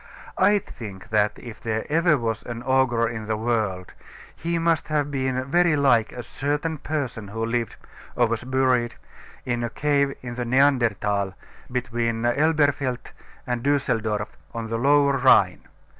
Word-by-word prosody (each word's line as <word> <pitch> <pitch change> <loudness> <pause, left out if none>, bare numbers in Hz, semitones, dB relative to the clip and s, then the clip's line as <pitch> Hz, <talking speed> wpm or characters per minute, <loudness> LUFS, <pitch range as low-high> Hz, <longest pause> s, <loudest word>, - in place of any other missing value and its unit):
I 205 - +5
think 105 - -9
that, 105 -1 +1
if 120 -3 -10
ever 110 -1 -2 0.2
there 170 -4 +4
was 115 -3 -2
an 120 0 -7
ogre 130 -3 +2
in 110 -2 -5
the 110 -1 -1
world, 110 -5 -1 0.4
he 170 0 -2
must 165 -1 +1
have 145 -2 0
been 130 -1 -1
very 170 +3 +3
like 125 -6 +3
a 125 - -7
certain 145 +6 -2
person 130 -8 -3
who 115 +3 -3
lived, 115 0 -2 0.4
or 120 - +4
was 115 0 -2
buried, 130 -2 +1 0.5
in 120 -1 -1
a 120 - -1
cave 140 +1 +1
in 125 -1 -5
the 125 0 -3
Neanderthal, 115 -7 +2 0.4
between 115 -2 -1
Elberfeld 140 -1 +1 0.3
and 120 -1 -2
Dusseldorf, 115 -6 0 0.3
on 115 -1 -4
the 115 - -1
Lower 140 +1 +4
Rhine. 100 -9 +4
125 Hz, 150 wpm, -24 LUFS, 115-140 Hz, 0.5 s, I